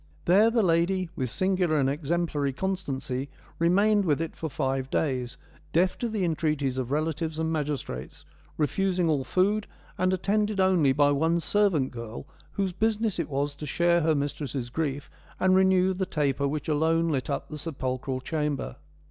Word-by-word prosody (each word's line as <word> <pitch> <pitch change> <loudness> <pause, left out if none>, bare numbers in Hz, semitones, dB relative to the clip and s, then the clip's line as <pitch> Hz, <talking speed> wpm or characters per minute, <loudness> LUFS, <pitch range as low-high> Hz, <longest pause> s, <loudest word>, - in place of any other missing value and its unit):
There 200 +6 +5
the 230 -1 +2
lady 175 +1 +2
' - - -28
with 130 -3 -2
singular 185 +1 +1
and 135 - +2
exemplary 150 -1 -1
constancy,' 140 -7 -3 0.3
remained 200 +5 +4
with 155 -6 +1
it 165 0 -4
for 160 - -4
five 135 -1 -2
days, 130 -4 -1 0.4
deaf 180 +3 +3
to 240 - -1
the 210 -4 -1
entreaties 150 -5 0
of 125 -2 -3
relatives 155 +2 -1
and 160 0 -1
magis 150 -2 -1
trates, 65 +2 -8 0.3
refusing 180 +3 +1
all 150 -4 +1
food, 205 +7 +1 0.3
and 185 0 +2
attended 205 +2 0
only 185 -7 +4
by 145 +1 +4
one 160 +4 +2
servant 180 -7 +1
girl 115 0 -7 0.3
whose 195 -2 -1
business 215 0 0
it 170 - -2
was 145 +1 -1
to 150 +1 -8
share 170 +4 +2
her 160 0 +2
mistress' 140 -3 -3
grief 145 -2 -2 0.3
and 185 0 +4
renew 190 0 +4
the 185 0 -2
taper 140 -4 0
which 150 +1 -3
alone 160 +2 +2
lit 140 -3 -1
up 140 - -3
the 155 - -6
sepulchral 130 -4 -3
chamber. 150 - -2
160 Hz, 170 wpm, -27 LUFS, 140-185 Hz, 0.4 s, There